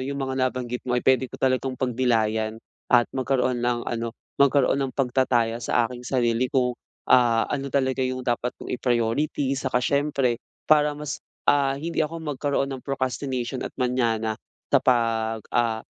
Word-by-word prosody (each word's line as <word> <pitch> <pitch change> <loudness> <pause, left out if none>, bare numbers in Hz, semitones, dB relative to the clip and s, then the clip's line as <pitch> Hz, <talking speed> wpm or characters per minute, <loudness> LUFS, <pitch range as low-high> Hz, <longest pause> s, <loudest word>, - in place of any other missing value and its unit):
yung 140 +2 -3
mga 130 0 -2
nabanggit 125 -1 -4
mo 125 - +2
ay - - -2
pwede 130 0 +3
ko - - -9
talagang 130 0 0
pagnilayan 110 -4 0 0.3
at 120 -1 +5
magkaroon 130 -2 0
ng 120 -1 0
ano, 115 -1 -3 0.2
magkaroon 140 0 +4
ng 135 -1 -2
pagtataya 125 -3 +1
sa 120 0 +2
aking 120 +1 -6
sarili 120 -1 +1
kung, 125 -3 +1 0.4
ah, 120 -2 +5
ano 140 -1 -2
talaga 130 -1 0
yung 130 0 -2
dapat 120 0 -1
kong - - -7
i-priority 125 +3 0
saka 130 -2 0
siyempre 140 -4 +1 0.2
para 150 -1 +3
mas, 150 -1 -5 0.2
ah, 140 -1 +3
hindi 165 +4 -3
ako 160 +1 -1
magkaroon 140 -1 -1
ng 130 - -6
procrastination 130 -1 -2
at - - -5
manyana 115 -3 0 0.4
sa - - +6
pag, 115 -2 +1
ah, 115 -2 +1
130 Hz, 160 wpm, -25 LUFS, 120-135 Hz, 0.4 s, sa